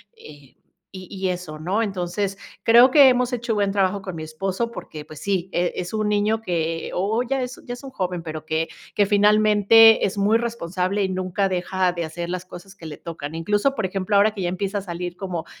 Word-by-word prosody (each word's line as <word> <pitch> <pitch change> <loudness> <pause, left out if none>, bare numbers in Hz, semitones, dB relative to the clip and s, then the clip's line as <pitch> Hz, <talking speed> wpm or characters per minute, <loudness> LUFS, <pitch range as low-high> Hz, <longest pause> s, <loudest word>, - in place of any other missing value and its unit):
eh, 145 - -15 0.4
y 185 -2 -10
y 190 -1 -2
eso, 175 -4 -5
¿no?". 195 +8 0
Entonces, 195 0 -3 0.2
creo 235 +3 +7
que 275 -1 +7
hemos 250 0 +1
hecho 235 -1 -2
buen 200 -2 +1
trabajo 195 0 0
con 185 -3 -7
mi 155 - -6
esposo, 190 +8 -3
porque, 155 -9 -9
pues 155 - -11
sí, 190 -2 -1
eh, 175 0 0
es 180 +3 -5
un 215 -1 0
niño 210 +2 +1
que 165 -4 -2
o 210 +6 0
ya 265 +1 -1
es 250 +1 -7
ya 245 - -5
es 245 - -14
un 270 - -8
joven, 180 -6 -3
pero 155 -1 -6
que 160 +1 -1 0.3
que 205 - +4
finalmente 210 +2 +5
es 195 - -6
muy 210 +3 +3
responsable 195 -4 -2
y 190 - -1
nunca 185 +1 -1
deja 185 0 0
de 170 -2 -3
hacer 170 +2 -6
las 185 0 -3
cosas 190 +2 -12
que 165 -4 -10
le 150 - -8
tocan. 160 -2 -7
Incluso, 205 +11 0
por 220 - -1
ejemplo, 195 +2 -2
ahora 205 +2 +5
que 200 - -6
ya 175 - 0
empieza 195 +2 -2
a - - -7
salir 175 -1 -6
como, 175 -4 -5
195 Hz, 220 wpm, -22 LUFS, 175-215 Hz, 0.4 s, creo